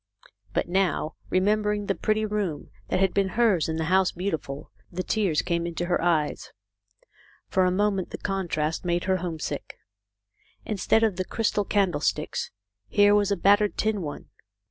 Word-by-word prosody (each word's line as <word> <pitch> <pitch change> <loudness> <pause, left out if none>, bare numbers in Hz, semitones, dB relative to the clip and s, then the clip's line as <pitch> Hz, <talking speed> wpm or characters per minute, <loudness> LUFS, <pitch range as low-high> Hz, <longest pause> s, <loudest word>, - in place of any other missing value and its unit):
But - - 0
now, 180 -3 0 0.2
remembering 210 +2 +1
the 195 - +1
pretty 215 +2 0
room 205 -8 -3 0.2
that 185 - 0
had 190 -1 +2
been 195 -1 +1
hers 210 -10 +3
in 160 - -1
the 160 - -1
House 185 +3 +3
Beautiful, 160 -7 -4 0.2
the 185 +1 -3
tears 195 -8 +1
came 170 -1 -1
into 170 +1 -3
her 175 0 0
eyes. 165 -3 0 1.0
For 185 -1 +3
a 180 - +2
moment 195 -1 0
the - - -6
contrast 170 -6 -2
made 175 -1 0
her 190 0 +1
homesick. 170 -3 -5 0.9
Instead 215 +2 +2
of 210 -5 +1
the 185 - 0
crystal 210 -1 0
candle 190 -8 +1
sticks, - - -1 0.4
here 205 - +5
was 205 -1 +3
a 200 - +1
battered 205 +1 +3
tin 215 -2 0
one. 145 -3 -6
190 Hz, 165 wpm, -26 LUFS, 170-205 Hz, 1.0 s, here